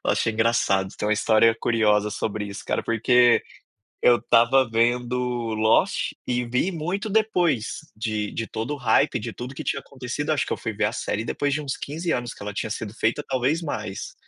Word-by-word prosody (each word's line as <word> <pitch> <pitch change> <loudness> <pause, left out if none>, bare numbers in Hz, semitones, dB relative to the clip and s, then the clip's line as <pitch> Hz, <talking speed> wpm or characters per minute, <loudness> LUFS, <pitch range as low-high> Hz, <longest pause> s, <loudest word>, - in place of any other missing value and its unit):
Lost - - +1
é - - +3
engraçado, 110 -4 +1
tem 105 - -1
uma - - +3
história 110 +1 +4
curiosa 105 -2 +2
sobre 105 0 -3
isso 100 0 -7
cara, - - 0
porque 120 +1 +4 0.6
eu 120 -1 +6
estava 120 +2 +4
vendo 120 +2 +1 0.4
Lost, 110 +1 +2
e 125 -1 0
vi 125 +10 0
muito 185 +6 -3
depois 180 - +1 0.2
de 110 -1 -2
de 115 - -4
todo 110 +5 -4
o - - -9
hype, 125 -4 +2
de - - -6
tudo 125 +2 -7
que - - -6
tinha - - -1
acontecido, 135 +3 -4
acho 150 - +1
que - - -2
eu - - -4
fui 110 - -4
ver 105 +1 0
a 105 - 0
série 110 -2 -3
depois 145 +4 -1
de 150 - -1
uns 140 -3 -4
15 165 +4 -4
anos 120 -1 -2
que - - -16
ela 105 0 -5
tinha 110 - -3
sido 105 0 -5
feita, 115 +6 0
talvez 135 +5 0
mais. 110 - -5
120 Hz, 200 wpm, -24 LUFS, 110-135 Hz, 0.6 s, eu